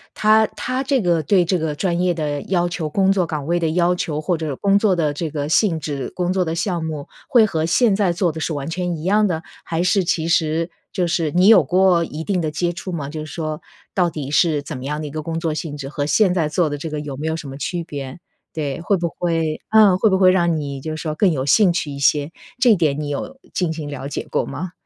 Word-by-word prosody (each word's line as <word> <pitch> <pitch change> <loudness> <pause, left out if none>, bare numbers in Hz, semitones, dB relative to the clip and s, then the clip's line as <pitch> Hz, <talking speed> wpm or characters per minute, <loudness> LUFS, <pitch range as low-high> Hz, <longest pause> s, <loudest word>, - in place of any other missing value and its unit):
它 215 +1 +4
它 255 +2 -3
这 270 0 +1
个 170 -4 +2
对 180 +3 +3
这 180 +1 +1
个 155 -2 -2
专 170 +1 -1
业 180 0 +2
的 150 -3 -2
要 175 -2 0
求， 170 -3 -3
工 190 +5 +2
作 185 -3 +1
岗 150 -3 -4
位 170 +3 +1
的 165 -2 0
要 175 +2 +2
求， 155 -4 -2
或 175 +3 0
者 155 -3 -3
工 200 +6 +2
作 205 -3 +3
的 155 -4 0
这 160 +2 -3
个 145 -1 -3
性 165 +1 +2
质， 140 -4 -4
工 180 0 0
作 185 -1 +1
的 165 -1 -3
项 170 -1 -1
目， 155 -3 -5 0.2
会 235 -3 +6
和 160 -6 -1
现 210 +5 +3
在 195 -3 +2
做 170 0 0
的 160 - -7
是 160 - -2
完 140 -1 -4
全 175 +1 -2
一 155 - -8
样 210 +4 +3
的？ 165 -3 -2 0.2
还 165 +1 -2
是 185 +2 +2
其 165 -2 0
实 165 0 +1 0.2
就 180 - 0
是 170 -2 0
你 180 +4 +4
有 225 - +8
过 180 -2 +3
一 160 -1 -6
定 185 0 0
地 155 - -1
接 175 +3 -1
触 185 +2 -6
吗？ 155 -5 -4
就 155 +2 -6
是 - - -8
说， 155 -2 -4 0.3
到 180 -2 +2
底 145 -4 -6
是 155 -2 +2
怎 150 - -6
么 - - -8
样 150 +2 -3
的 155 - -5
一 145 - -6
个 155 +1 -4
工 165 +1 -3
作 165 -2 -1
性 150 -1 -5
质， 135 -2 -6
和 145 0 -3
现 190 +3 +3
在 165 -4 0
做 160 +1 +1
的 145 - -3
这 160 - -5
个 150 -1 -4
有 145 -2 -6
没 155 - -3
有 160 - 0
什 160 -3 -7
么 135 - -7
区 170 +4 -3
别？ 140 -3 -7 0.4
对， 150 0 -3
会 200 +3 +1
不 170 -1 -1
会 165 -3 -1
嗯， 210 -4 +6
会 215 +3 +3
不 190 - +2
会 185 -1 +6
让 170 -3 +2
你 140 -3 -5
就 155 - -5
是 155 - -5
说 155 -2 -3
更 185 +2 +3
有 130 -3 -2
兴 185 +6 +5
趣 170 -3 -2
一 140 - -6
些， 145 +1 +2 0.3
这 245 -4 +5
点 150 -5 +1
你 150 - -3
有 145 - -5 0.2
进 180 -3 0
行 160 -2 -5
了 140 -1 -6
解 145 - -5
过 - - 0
吗？ 180 +2 -5
165 Hz, 285 characters per minute, -20 LUFS, 150-180 Hz, 0.4 s, 有